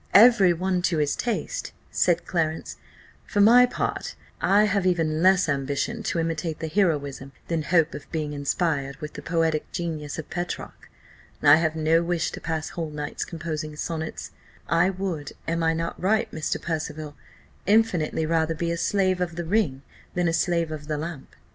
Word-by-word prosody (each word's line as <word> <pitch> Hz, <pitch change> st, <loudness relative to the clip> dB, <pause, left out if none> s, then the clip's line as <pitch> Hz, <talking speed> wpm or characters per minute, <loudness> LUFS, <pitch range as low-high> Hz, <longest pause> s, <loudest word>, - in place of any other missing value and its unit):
"Every 205 Hz, -3 st, +8 dB
one 180 Hz, +1 st, 0 dB
to 170 Hz, -, -1 dB
his 150 Hz, -2 st, +1 dB
taste," 245 Hz, -, -3 dB, 0.2 s
said 175 Hz, -1 st, +2 dB
Clarence; 160 Hz, -2 st, -2 dB, 0.5 s
"for 205 Hz, -, -2 dB
my 240 Hz, +4 st, +7 dB
part -, -, -3 dB, 0.3 s
I 205 Hz, +2 st, +5 dB
have 200 Hz, -2 st, +1 dB
even 160 Hz, -3 st, +1 dB
less 185 Hz, 0 st, +5 dB
ambition 140 Hz, -, -1 dB
to 205 Hz, -, -2 dB
imitate 165 Hz, -1 st, -1 dB
the 160 Hz, -, -4 dB
heroism 145 Hz, -7 st, 0 dB, 0.2 s
than 165 Hz, -2 st, 0 dB
hope 165 Hz, +1 st, +2 dB
of -, -, -9 dB
being 155 Hz, -3 st, -2 dB
inspired 140 Hz, -1 st, -1 dB
with 150 Hz, +1 st, -8 dB
the -, -, -7 dB
poetic 165 Hz, -2 st, 0 dB
genius 155 Hz, -4 st, -4 dB
of 160 Hz, -, -6 dB
Petrarch. 175 Hz, 0 st, -5 dB, 0.5 s
I 145 Hz, +1 st, +8 dB
have 160 Hz, -1 st, 0 dB
no 160 Hz, +1 st, +3 dB
wish 170 Hz, -1 st, -1 dB
to -, -, -8 dB
pass 160 Hz, -1 st, -3 dB
whole 165 Hz, -2 st, -4 dB
nights 150 Hz, -1 st, -4 dB
composing 155 Hz, -2 st, -5 dB
sonnets. 160 Hz, +1 st, -4 dB, 0.4 s
I 170 Hz, +3 st, +3 dB
would 185 Hz, -6 st, -4 dB
(am 165 Hz, +1 st, 0 dB
I 165 Hz, 0 st, +2 dB
not 165 Hz, +1 st, -3 dB
right, 220 Hz, +4 st, +1 dB
Mr. 155 Hz, -1 st, -2 dB
Percival?) 155 Hz, -2 st, -4 dB, 0.5 s
infinitely 190 Hz, -7 st, +2 dB
rather 165 Hz, 0 st, +1 dB
be 170 Hz, +2 st, -1 dB
a 170 Hz, -, -1 dB
slave 185 Hz, 0 st, +1 dB
of 170 Hz, -2 st, -2 dB
the 175 Hz, 0 st, -4 dB
ring 160 Hz, -8 st, 0 dB, 0.3 s
than 175 Hz, -1 st, +1 dB
a 165 Hz, -, +1 dB
slave 170 Hz, -2 st, +1 dB
of 150 Hz, -1 st, -6 dB
the 155 Hz, -1 st, -1 dB
lamp." 155 Hz, -3 st, -7 dB
165 Hz, 175 wpm, -25 LUFS, 155-180 Hz, 0.5 s, Every